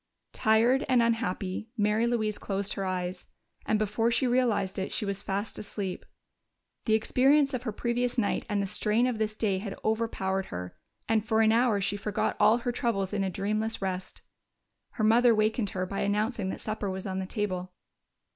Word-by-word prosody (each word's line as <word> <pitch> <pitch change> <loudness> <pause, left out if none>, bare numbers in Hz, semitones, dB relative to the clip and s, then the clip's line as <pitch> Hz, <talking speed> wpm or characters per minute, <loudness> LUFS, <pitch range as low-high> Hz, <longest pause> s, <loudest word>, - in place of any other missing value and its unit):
Tired 230 +5 +3
and 255 -2 +5
unhappy, 220 -3 -1
Mary 210 +2 +2
Louise 220 -3 0
closed 200 0 -2
her 195 - -3
eyes, 180 -1 -3 0.4
and 215 - +3
before 215 +2 +1
she 235 +2 +2
realized 240 -7 +1
it 190 - -3
she - - -1
was 200 0 -3
fast 200 +2 -3
asleep. 200 -3 -5 0.8
The 220 - +4
experience 275 +6 +3
of 250 - -2
the 220 - -1
previous 240 +3 -1
night 220 -4 +1
and 205 -1 0
the 200 - 0
strain 215 +4 +1
of 245 -3 -1
this 215 0 -1
day 200 -4 0
had 195 0 -6
overpowered 205 -4 0
her, 90 0 -6 0.3
and 220 -1 +2
for 220 0 +2
an 220 0 +5
hour 230 -2 +3
she 200 +1 -1
forgot 210 0 -1
all 215 +2 +6
her 245 0 -2
troubles 210 -5 -1
in 200 -1 0
a 190 - 0
dreamless 215 +4 -1
rest. 185 -1 -4 0.7
Her 220 - -2
mother 230 +2 +5
wakened 215 0 +1
her 185 0 -2
by 195 +2 -4
announcing 210 0 0
that - - -5
supper 215 -2 -3
was 190 0 -5
on 190 -1 -2
the 190 - -4
table. 185 -4 -3
215 Hz, 185 wpm, -28 LUFS, 195-230 Hz, 0.8 s, all